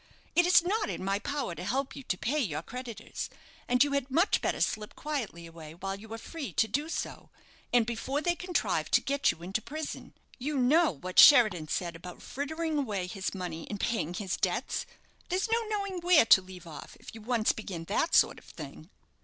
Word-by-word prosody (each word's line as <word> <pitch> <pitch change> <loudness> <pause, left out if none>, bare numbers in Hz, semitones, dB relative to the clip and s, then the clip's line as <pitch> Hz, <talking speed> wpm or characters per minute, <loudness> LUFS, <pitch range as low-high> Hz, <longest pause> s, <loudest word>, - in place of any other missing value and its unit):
It 350 0 +5
is 360 -2 +6
not 420 +4 0
in - - -4
my 195 +1 +1
power 285 +2 -3
to - - -7
help 270 +1 -1
you 275 - -7
to 195 -8 -2
pay 285 +11 0
your 165 - -2
creditors, 245 0 -6 0.4
and 250 +1 +5
you 290 - -1
had 280 -1 -1
much 335 +9 +3
better - - -1
slip 215 -1 -1
quietly 245 - -4
away 165 -1 -11
while 195 +2 -4
you 215 +2 -12
are 225 - -4
free 290 +3 -7
to 220 - +3
do 290 +9 -2
so, - - -5 0.4
and 240 -2 +4
before 240 +5 -2
they 345 +3 +1
contrive 360 0 -1
to - - +5
get 280 0 +1
you 170 - -2
into 195 +5 -2
prison. 310 +5 -6 0.2
You 290 +3 -2
know 305 +7 +4
what 180 +2 -1
Sheridan 215 - +8
said 170 +2 -2
about 175 +2 -10
frittering 315 +2 -2
away 205 -9 -2
his 190 +2 -4
money 175 -3 -5
in 205 - -5
paying 180 -5 -1
his 195 -3 -2
debts. - - -1 0.4
There's 375 +5 0
no 460 +1 +3
knowing 400 -3 -2
where 345 -7 +5
to 195 - +7
leave 185 -1 -12
off 160 -2 -10
if - - -11
you 225 - -10
once 230 -1 +2
begin 185 -6 -6
that 205 - 0
sort - - +4
of - - -22
thing." 155 +1 -10
235 Hz, 205 wpm, -30 LUFS, 185-300 Hz, 0.4 s, Sheridan